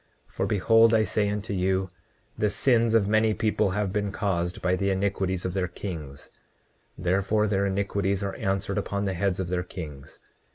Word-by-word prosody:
29:31 - - -28
For - - -1
behold 115 +3 +4
I 110 - +4
say 105 +1 0
unto 105 0 -3
you, 95 0 0 0.4
the 105 - +1
sins 115 +1 +2
of 105 -3 +3
many 110 0 +3
people 110 -3 +1
have 100 -2 -1
been 105 -1 -1
caused 90 -3 -1
by 90 0 +1
the 100 +1 0
iniquities 95 -1 -1
of 90 - -2
their 95 -1 0
kings; 80 -6 -7 0.7
therefore 100 +5 +1
their 100 -1 +1
iniquities 100 0 -1
are 100 - -2
answered 100 +1 -1
upon 100 0 -2
the 95 - -1
heads 95 +1 -1
of 90 -2 -2
their 90 0 0
kings. 80 -7 -9
100 Hz, 180 wpm, -26 LUFS, 95-105 Hz, 0.7 s, behold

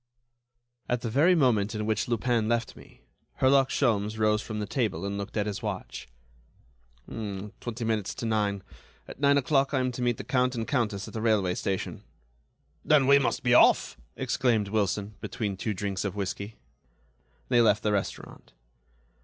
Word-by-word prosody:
At 125 -1 0
the 115 - -3
very 160 +9 +4
moment 115 - +2
in 105 0 -2
which 110 -1 0
Lupin 120 -1 0
left 115 0 -1
me, - - -17 0.3
Herlock 135 0 +4
Sholmes 110 -4 0
rose 105 0 +2
from 110 -1 -6
the 105 - -2
table, 110 -3 -2
and 100 0 -3
looked 100 +2 -5
at 105 - +1
his 105 +2 -4
watch. 105 -4 -5 1.0
"Twenty 110 +3 -6
minutes 110 -3 -1
to - - -5
nine. 105 -3 0 0.4
At - - -10
nine 140 0 +4
o'clock 140 0 +1
I - - +2
am 130 0 0
to 125 - -6
meet 120 -1 +1
the - - -6
Count 125 -1 +1
and 115 -1 -3
Countess 105 -7 -1
at - - -10
the 110 - -4
railway 105 -5 +2
station." 95 +1 -3 0.8
"Then, 150 -3 +4
we 140 +1 +6
must 120 -1 -1
be 120 -1 +3
off!" - - +5 0.2
exclaimed 110 -5 0
Wilson, 105 0 -1
between 105 -4 -3
two 105 +2 -3
drinks 100 0 -3
of 100 -1 -3
whisky. 100 +2 -4 0.9
They 120 -2 +4
left 110 -3 +3
the 105 - +1
restaurant. 100 -2 -4
110 Hz, 170 wpm, -27 LUFS, 105-125 Hz, 1.0 s, we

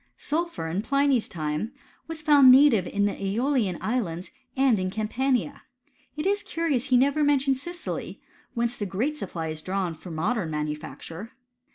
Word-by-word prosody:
Sulphur, 335 - -2
in 175 +5 -1
Pliny*s 275 -1 +2
time, 155 - -3 0.3
was 320 -1 -7
found 285 -4 +7
Uative 260 -10 +5
in 205 0 +1
the 205 - +1
^olian 210 - 0
islands, 190 -7 -2 0.3
and 260 -6 +4
in 185 0 -1
Campania. 240 +6 -1 0.6
It 300 - -3
is 405 +1 +1
curious 305 -7 -1
that - - -8
he 255 - +5
never 280 +4 +3
mentions 275 -2 +2
Sicily, 345 +3 -6 0.4
whence 235 0 0
the 205 - -3
great 235 +11 -1
supply 170 - -5
is 155 0 -4
drawn 185 -1 -2
for 165 +3 -11
modem 175 +3 -1
manufacture. 155 +7 -5
235 Hz, 160 wpm, -26 LUFS, 185-280 Hz, 0.6 s, found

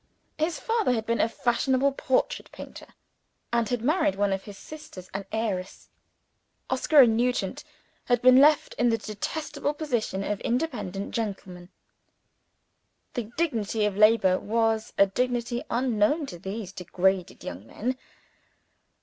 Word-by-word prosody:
His 320 +2 0
father 450 - +1
had 220 -2 -2
been 230 0 +1
a 225 - +2
fashionable 260 +4 +1
portrait 265 -1 -1
painter, - - -10 0.7
and 235 -2 +1
had 245 -2 -2
married 305 - +2
one 200 0 +1
of 195 - -4
his 205 -2 -10
sitters 200 -13 -11
an 195 0 -4
heiress. 205 -5 -3 0.8
Oscar 300 -3 +5
and 230 -3 +5
Nugent 245 +2 -1 0.4
had 245 -1 +2
been 255 +1 +7
left 295 +2 +5
in 240 0 +4
the 225 - +2
detestable 285 +8 -4
position 240 -10 -2
of 205 0 -3
independent 230 - -2
gentlemen. 190 -5 -5 1.4
The 235 -4 -4
dignity 225 -9 0
of 205 -2 -1
labor 210 -3 +5
was 225 0 0
a 200 - +7
dignity 240 +3 -1
unknown 250 +4 +1
to 175 -10 -9
these 195 +1 -5
degraded 185 0 -1
young 90 +5 -7
men. 250 - -3
230 Hz, 135 wpm, -26 LUFS, 200-255 Hz, 1.4 s, been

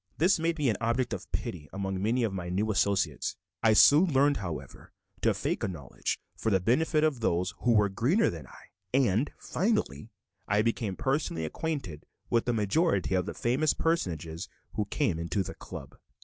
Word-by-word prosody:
This 175 +3 +3
made 165 +1 0
me 145 -3 +1
an 110 -5 +1
object 120 +2 0
of - - -7
pity 75 -5 -4
among 95 -1 -3
many 115 +4 +1
of 110 -4 0
my 90 -2 -4
new 105 +5 0
associates. 95 -7 0 0.3
I 110 - +5
soon 155 - +7
learned, 140 +1 +4
however, 80 -9 -7 0.3
to - - +4
fake - - -2
a - - +1
knowledge 80 -9 -4 0.2
for 110 - -1
the 95 -3 +3
benefit 150 - +2
of 155 -5 +1
those 90 -2 0
who 120 - +3
were 105 -2 +4
greener 120 - +2
than 80 -6 -8
I; - - -15 0.3
and, 120 0 +2
finally, 180 - -1 0.4
I 105 +1 +2
became 115 -4 -1
personally 135 - -1
acquainted 115 - -4 0.2
with 115 -1 +2
the 120 - +1
majority 105 - +1
of 90 -1 +1
the - - -5
famous 135 +6 +1
personages 85 - -2 0.2
who 105 - -1
came 85 - -1
to 95 +3 +1
the - - -7
"Club." - - -9
110 Hz, 180 wpm, -29 LUFS, 90-140 Hz, 0.4 s, soon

